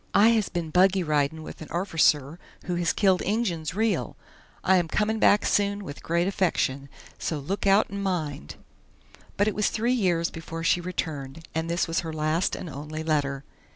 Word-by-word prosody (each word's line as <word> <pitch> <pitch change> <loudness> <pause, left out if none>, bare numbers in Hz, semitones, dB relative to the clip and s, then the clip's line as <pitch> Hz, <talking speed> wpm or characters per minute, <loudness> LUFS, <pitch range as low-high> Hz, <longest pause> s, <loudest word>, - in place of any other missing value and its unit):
I 210 +3 +7
has 220 -4 +2
been 170 -3 -4
buggy 185 +1 +4
ridin' 150 0 0
with - - -10
an 155 - -7
orficer 165 -4 +1 0.3
who 180 - -2
has 175 -1 +1
killed 190 -3 +2
injuns 180 -7 -1
real! 220 +1 0 0.5
I 190 - +4
am 175 -2 +1
comin' 215 +5 0
back 205 - +4
soon 200 0 +1
with 145 -6 -8
grate 170 +2 0
affeckshun, 140 -8 0 0.3
so 160 - -2
luke 190 +8 -3
out 195 +1 +4
and 200 0 -4
mind." 160 - -3 0.8
But 205 - +3
it 215 - +1
was 210 - +1
three 235 +3 0
years 175 -8 +1
before 165 0 -7
she 175 - +2
returned, 160 -4 -5
and 160 +1 -2
this 170 +1 0
was 165 0 0
her 165 -2 -4
last 155 +3 0
and - - -7
only 150 +2 -6
letter. 140 -3 0
170 Hz, 185 wpm, -26 LUFS, 155-195 Hz, 0.8 s, I